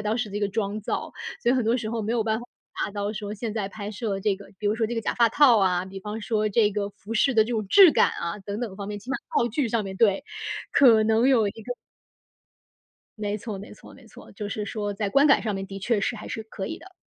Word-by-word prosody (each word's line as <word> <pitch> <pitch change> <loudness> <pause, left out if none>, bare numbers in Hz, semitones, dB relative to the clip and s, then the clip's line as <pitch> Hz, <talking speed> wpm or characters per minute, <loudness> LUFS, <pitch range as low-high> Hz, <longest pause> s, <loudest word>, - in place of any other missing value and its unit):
当 215 +1 -1
时 240 -4 -2
这 205 - -3
个 205 -1 0
妆 205 0 -2
造。 - - -3 0.3
所 240 - +3
以 255 - +4
很 250 -3 +1
多 230 +3 +2
时 220 -2 -4
候 230 - -2
没 220 +2 -2
有 235 - +1
办 220 0 0
法 240 - -8 0.4
达 200 - -5
到 205 0 -2
说 210 -1 -5
现 215 0 -4
在 205 -3 -2
拍 205 0 -6
摄 205 -2 -3
这 195 -1 +1
个 200 - -13
比 210 - -3
如 215 - 0
说 225 -1 +1
这 240 - -4
个 225 - -1
假 - - -2
发 235 -1 +4
套 255 -6 +6
啊， 180 -2 +2
比 195 +1 -8
方 210 +3 -6
说 215 -1 0
这 210 0 +3
个 200 0 -2
服 210 +3 -10
饰 245 +3 +2
的 220 - +6
这 220 - -5
种 220 -3 -1
质 370 - +8
感 - - +4
啊 170 +4 -4
等 200 +3 -5
等 210 -6 -4
方 200 -1 -6
面， 205 0 -5
起 250 +6 -9
码 275 - +1 0.2
道 235 - +3
具 250 +1 -1
上 225 -1 0
面 190 -1 -6
对， 200 -3 +3 0.5
可 230 -6 +6
能 225 +4 +3
有 225 -6 +4
一 - - -2
个 225 +4 -7 1.4
没 210 0 -2
错 210 -2 -6
没 205 - -10
错 - - -15
没 250 -4 -17
错， - - -14
就 205 0 -6
是 210 0 -3
说 205 -1 -3
在 205 0 -2
观 280 +7 +5
感 275 - +5
上 215 - -1
面 195 0 -4
的 195 0 -7
确 215 0 0
是 235 - -1
还 210 - -8
是 220 - -4
可 205 -3 -6
以 - - -5
的。 370 +2 -15
215 Hz, 300 characters per minute, -25 LUFS, 205-230 Hz, 1.4 s, 质